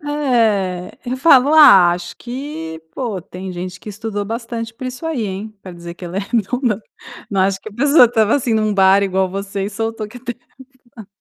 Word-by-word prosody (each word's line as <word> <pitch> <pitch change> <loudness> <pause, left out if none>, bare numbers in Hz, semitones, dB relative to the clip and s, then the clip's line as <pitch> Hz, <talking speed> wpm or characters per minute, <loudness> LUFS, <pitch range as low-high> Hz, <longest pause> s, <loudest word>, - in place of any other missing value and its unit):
É. 225 -11 0
Eu 250 +1 -3
falo: 275 0 +5
"Ah, 245 - +8
acho 175 0 -6
que, 240 - -7
pô, 230 -8 -3
tem 185 +2 -8
gente 180 +1 -6
que 215 - -11
estudou 205 0 -4
bastante 230 +1 -5
por 255 +2 -7
isso 255 +5 -7
aí, 295 -9 -2
hein, 200 +3 -6
pra 185 - -9
dizer 170 0 -9
que 180 - -11
ela 175 +1 -6
é - - +1
redonda. 230 +1 -1 0.5
Não 195 -2 0
acho 190 0 0
que - - -9
a - - -15
pessoa 280 +5 +5
estava, 225 -2 +2
assim, 245 -5 0
num 215 -1 +1
bar 195 0 +4
igual 190 -1 0
você, 195 0 -4
e 200 - -4
soltou 225 0 -4
que 235 - -13
a - - -10
terra 245 -1 -6
é - - -38 0.4
plana". 220 -5 -11
215 Hz, 215 wpm, -18 LUFS, 190-245 Hz, 0.5 s, Ah